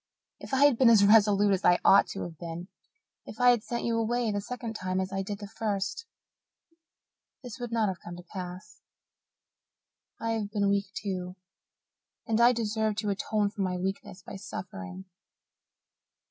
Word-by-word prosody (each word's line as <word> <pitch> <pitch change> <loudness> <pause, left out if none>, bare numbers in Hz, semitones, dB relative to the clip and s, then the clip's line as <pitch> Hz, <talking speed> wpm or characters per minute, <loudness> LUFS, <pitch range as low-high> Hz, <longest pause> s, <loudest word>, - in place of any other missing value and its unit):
If - - -10
I 270 +1 +5
had 280 -5 +4
been 255 -3 +7
as 210 -3 +6
resolute 205 -1 +5
as 190 - -1
I 175 0 +5
ought 195 - +7
to - - -5
have 165 -3 -8
been 170 +2 -7 0.6
if 215 - -10
I 245 0 +7
had 240 -3 +1
sent 235 +2 -4
you 230 -1 0
away 235 0 0
the 205 0 -2
second 230 +1 -6
time 185 -3 -2
as 190 +1 -3
I 195 - -1
did 200 +1 -5
the 205 0 -8
first 215 - -3 1.4
this 245 0 -8
would 240 -1 -5
not 225 -2 +1
have 185 -3 -3
come 175 - -8
to 175 - -11
pass. 180 +1 -9 1.4
I 230 - -2
have 220 -3 -2
been 205 -1 0
weak 200 -1 0
too, 185 -3 -4 0.9
and 225 +1 +1
I 240 +1 +7
deserve 220 -2 -1
to 210 -1 -1
atone 205 +1 -1
for 205 - -5
my 185 -1 -1
weakness 190 0 -5
by - - -8
suffering. 190 -1 -8
205 Hz, 175 wpm, -28 LUFS, 190-225 Hz, 1.4 s, been